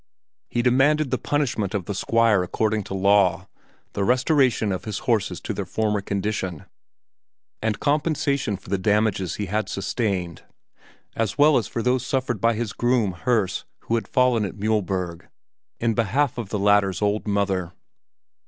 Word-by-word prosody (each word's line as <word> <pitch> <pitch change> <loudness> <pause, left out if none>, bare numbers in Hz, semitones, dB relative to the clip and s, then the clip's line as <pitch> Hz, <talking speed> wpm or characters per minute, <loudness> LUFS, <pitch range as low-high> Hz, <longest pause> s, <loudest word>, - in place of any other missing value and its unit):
He 120 - 0
demanded 135 +3 +3
the 130 - 0
punishment 120 -8 -1
of 95 -4 -2
the 100 - -3
Squire 115 0 +2
according 110 +4 -1
to 95 - -5
law, 95 -1 +3 0.5
the 100 - -1
restoration 125 -2 +2
of 95 - -2
the 110 - -6
horses 115 -5 0
to - - -4
their 100 - -3
former 105 +2 0
condition, 100 -4 -3 1.0
and 110 -1 -1
compensation 145 -6 0
for - - -16
the 100 - +1
damages 105 -2 +1
he 105 - -3
had 105 +3 -2
sustained 95 -4 -2 0.7
as 110 -3 -1
well 150 +1 +6
as 110 - +1
for 115 - -3
those 125 0 +1
suffered 125 -6 -2
by 115 0 +3
his 110 -2 -3
groom, 120 -5 +1
Herse, 100 +1 0 0.2
who - - -4
had 115 - 0
fallen 125 -4 +2
at 95 - -4
Mühlberg 95 -5 -2 0.5
in 115 -1 +1
behalf 120 +4 0
of 110 -5 -5
the 105 - -2
latter's 100 -1 +2
old 105 +1 0
mother. 95 -3 0
105 Hz, 160 wpm, -23 LUFS, 100-120 Hz, 1.0 s, well